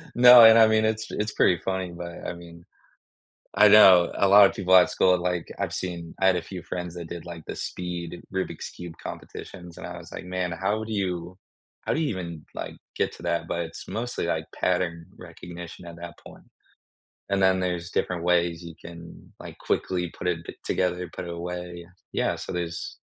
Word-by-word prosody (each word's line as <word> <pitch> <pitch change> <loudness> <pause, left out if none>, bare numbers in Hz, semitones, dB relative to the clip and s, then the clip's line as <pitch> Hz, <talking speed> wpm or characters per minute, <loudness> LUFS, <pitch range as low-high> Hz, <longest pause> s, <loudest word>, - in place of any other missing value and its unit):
No, 125 0 +10
and 110 0 +9
I 115 - +8
mean, 110 0 +3
it's 110 0 0
it's 105 0 -2
pretty 90 -2 +3
funny, 95 -1 -2
but 85 -1 -8
I - - -3
mean 85 0 -13 0.9
I 105 - +8
know. 95 -4 +7
A 100 - +4
lotta 100 0 +8
people 95 -1 +3
at 90 - +6
school, 90 -1 +3
like, 90 -1 -2
I've - - -2
seen 85 -2 -5
I 95 - +3
had 95 -1 +4
a 85 - -2
few 90 0 -8
friends 90 0 -5
that 85 -2 -7
did, 85 0 -7
like, 85 -2 -9
the - - -5
speed 90 -1 -5
Rubik's 95 0 -3
Cube 85 -2 -9
competitions, 90 -3 -9
and - - -7
I - - -7
was - - -12
like, - - -7
"Man, 90 -1 -2
how 95 +5 -1
would 110 - -6
you 90 -3 -3 0.5
how - - +1
do 155 - -1
you 155 - +1
even, 85 - -5
like, - - -6 0.2
get - - 0
to - - -13
that?" 85 -1 -1
But 85 - -2
it's 80 -1 -8
mostly, 120 -4 -3
like, 80 -1 -2
pattern 85 -2 -1
recognition 85 0 -10
at 85 -1 -9
that 85 -1 -10
point, - - -13 0.9
and 100 0 +1
then 95 0 +4
there's 90 -2 -3
different 90 -2 -1
ways 85 -1 +1
you 85 - -9
can, 85 0 -12
like, - - -10
quickly 90 -2 -1
put - - -4
it 85 -2 0
t - - -8
together 90 -1 -1
put - - -5
it 85 - -6
away, 90 0 -6
yes. 85 - -21 0.2
Yeah, - - 0
so - - -7
there's 85 -1 -4
90 Hz, 205 wpm, -25 LUFS, 85-95 Hz, 0.9 s, No